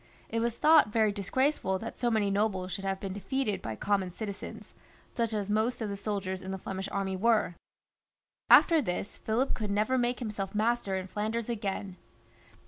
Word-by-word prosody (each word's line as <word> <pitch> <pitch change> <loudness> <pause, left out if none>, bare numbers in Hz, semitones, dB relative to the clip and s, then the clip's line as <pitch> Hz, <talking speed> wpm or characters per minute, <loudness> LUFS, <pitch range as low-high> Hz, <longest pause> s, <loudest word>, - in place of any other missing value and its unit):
It 230 - -1
was 235 0 0
thought 305 -8 +6
very 220 -1 +3
disgraceful 205 0 0
that 230 +4 -7
so 240 - +2
many 215 -3 +1
nobles 195 -2 0
should 195 - -4
have 195 0 -1
been 195 -1 -4
defeated 210 +2 -2
by 110 - -4
common 195 - 0
citizens, 200 +2 -7 0.4
such 230 -2 0
as 205 -2 -2
most 220 +4 +1
of 220 -3 -2
the 200 - -3
soldiers 195 -2 -3
in 190 - -7
the 190 - -3
Flemish 190 +1 -5
army 195 -1 -1
were. 220 -2 +2 1.0
After 330 -3 +7
this 200 -3 -4
Philip 240 +5 0
could 215 -3 -3
never 215 +6 +1
make 245 0 +1
himself 210 -4 -4
master 220 -2 +1
in 190 -1 -2
Flanders 215 +4 -3
again. 200 -4 -3
210 Hz, 180 wpm, -30 LUFS, 195-230 Hz, 1.0 s, After